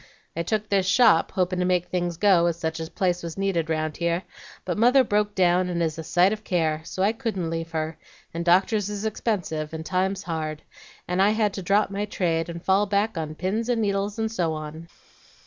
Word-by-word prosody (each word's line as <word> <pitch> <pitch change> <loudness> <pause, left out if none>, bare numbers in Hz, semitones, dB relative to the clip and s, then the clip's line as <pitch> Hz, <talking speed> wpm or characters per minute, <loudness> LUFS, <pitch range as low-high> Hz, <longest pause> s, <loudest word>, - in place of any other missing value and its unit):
I 165 - -1
took 215 +5 -1
this 195 -3 +1
shop, 210 -5 +4
hopin' 185 -1 0
to 180 - +1
make 180 -1 +1
things 175 -2 -2
go, 180 -3 +4
as 170 -1 -1
such 160 -1 -3
a 160 0 -5
place 180 -1 0
was 170 0 -6
needed 185 -5 0
round 155 -1 -1
here, 170 +1 0 0.4
but 175 - -1
mother 250 +4 +5
broke 210 -2 0
down, 180 0 +3
and 175 -1 -2
is 160 0 -2
a - - -4
sight 180 +5 +3
of 215 0 -7
care; 160 -5 0
so 185 +3 -3
I 205 - +4
couldn't 215 -9 -3
leave 165 0 -3
her, 160 0 -3 0.3
and 170 +1 -3
doctors 190 +4 +3
is 205 +1 -4
expensive, 170 -8 -2
and 160 0 -6
times 190 +2 -1
hard, 155 -2 -4 0.4
and 180 +1 +1
I 200 - +5
had 215 -2 +1
to 195 - -5
drop 200 +3 +2
my 200 +1 -2
trade, 170 -5 -1
and 170 0 -7
fall 195 +2 +3
back 205 +2 0
on 155 -2 -4
pins 210 +8 -2
and 240 -2 +1
needles, 200 0 -1
and 220 0 -1
so 175 -7 0
on.'" 155 +1 -7
180 Hz, 215 wpm, -25 LUFS, 165-205 Hz, 0.4 s, mother